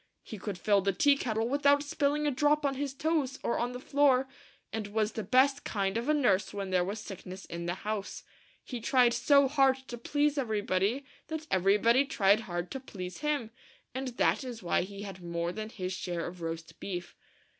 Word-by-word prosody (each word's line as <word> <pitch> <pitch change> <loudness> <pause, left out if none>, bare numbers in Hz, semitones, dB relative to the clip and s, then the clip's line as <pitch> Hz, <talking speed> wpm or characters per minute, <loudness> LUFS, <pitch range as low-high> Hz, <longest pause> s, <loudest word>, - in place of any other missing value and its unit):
He 215 - -8
could 195 -1 -4
fill 200 +2 +3
the 195 +1 +1
tea 285 +10 +4
kettle 225 -4 -1
without 285 +2 +3
spilling 295 0 0
a 295 - +2
drop 295 +3 +2
on 275 - +2
his 275 0 -3
toes 290 -2 -1
or 235 - 0
on 245 +1 -1
the 250 - -6
floor; 270 -1 +3 0.5
and 220 -2 -3
was 215 +1 0
the 220 - -4
best 265 +7 +3
kind 195 -2 -1
of 235 +5 -1
a - - +5
nurse 205 -9 +2
when 195 -2 -4
there 180 -1 +3
was 200 +4 -4
sick 195 -3 -8
ness 185 +1 -8
in 170 0 -6
the 175 - -1
house. 210 0 -4 0.4
He 245 -3 -6
tried 245 0 +4
so 280 +3 +5
hard 270 -1 +4
to 240 - -6
please 290 +3 +1
everybody 215 +1 0 0.2
that 315 0 -5
everybody 210 +7 +4
tried 205 -8 +3
hard 175 -5 -4
to 265 - -4
please 185 -8 -7
him, 290 -7 -1 0.4
and 265 +1 -3
that - - +2
is 240 -5 -7
why 175 - +2
he 200 +2 -7
had 195 -2 -8
more 170 0 -2
than 215 +3 -5
his 185 -4 -4
share 175 -2 -3
of 175 0 -8
roast 165 0 -6
beef. 180 -3 -5
225 Hz, 205 wpm, -30 LUFS, 190-275 Hz, 0.5 s, a